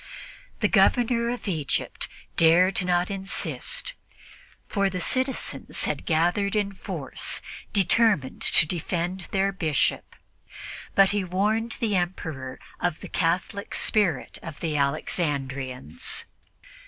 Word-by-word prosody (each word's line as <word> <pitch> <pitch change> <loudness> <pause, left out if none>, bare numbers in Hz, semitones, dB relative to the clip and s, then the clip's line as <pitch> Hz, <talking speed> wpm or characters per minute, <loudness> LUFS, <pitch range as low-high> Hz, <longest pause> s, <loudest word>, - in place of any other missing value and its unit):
The - - +4
Governor 235 -1 +3
of 245 -2 -4
Egypt 155 -7 -1 0.3
dared 180 +4 +5
not 180 +1 +1
insist, 340 - -2 0.7
for 200 -2 +1
the 185 -1 -4
citizens 260 +7 -1
had - - -3
gathered 175 +5 +2
in 205 -1 +1
force, 190 - -1 0.3
determined 200 - +3
to - - +6
defend 175 +2 -3
their 195 -1 +1
Bishop; 160 -7 0 0.8
but 195 0 +6
he 205 -1 0
warned 210 +6 0
the 215 -3 +1
Emperor 160 -8 -3 0.2
of 175 -3 -1
the - - -8
Catholic 180 +4 -1
spirit 185 -11 0
of 160 -3 -8
the 160 -3 -2
Alexandrians. 140 - -2
185 Hz, 110 wpm, -26 LUFS, 160-205 Hz, 0.8 s, to